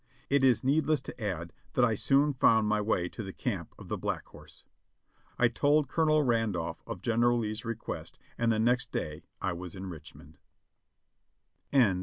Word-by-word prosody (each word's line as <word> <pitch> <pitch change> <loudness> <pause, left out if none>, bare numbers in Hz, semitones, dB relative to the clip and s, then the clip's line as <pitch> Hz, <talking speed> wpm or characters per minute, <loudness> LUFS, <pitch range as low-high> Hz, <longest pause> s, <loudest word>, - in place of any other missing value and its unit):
It 140 -1 +4
is 130 -2 +4
needless 150 +2 +2
to 120 - -8
add 85 -5 -3 0.2
that 125 - +4
I 115 - +1
soon 140 +6 +3
found 110 -4 +4
my 105 0 +2
way 100 -4 0
to 115 - -7
the 95 -3 -6
camp - - -4
of - - -11
the - - -3
Black - - -2
Horse. - - -13 0.7
I 120 - +5
told 145 +5 +2
Colonel 155 -2 +3
Randolph 110 - 0
of - - -6
General 120 +1 +3
Lee's 110 -1 -3
request 115 -1 -5 0.2
and 115 -1 +1
the 110 - +1
next 120 +3 +2
day 75 -1 -3 0.2
I 95 - 0
was 90 +1 -7
in 95 0 -6
Richmond. 80 -3 -11
115 Hz, 170 wpm, -30 LUFS, 95-130 Hz, 0.7 s, I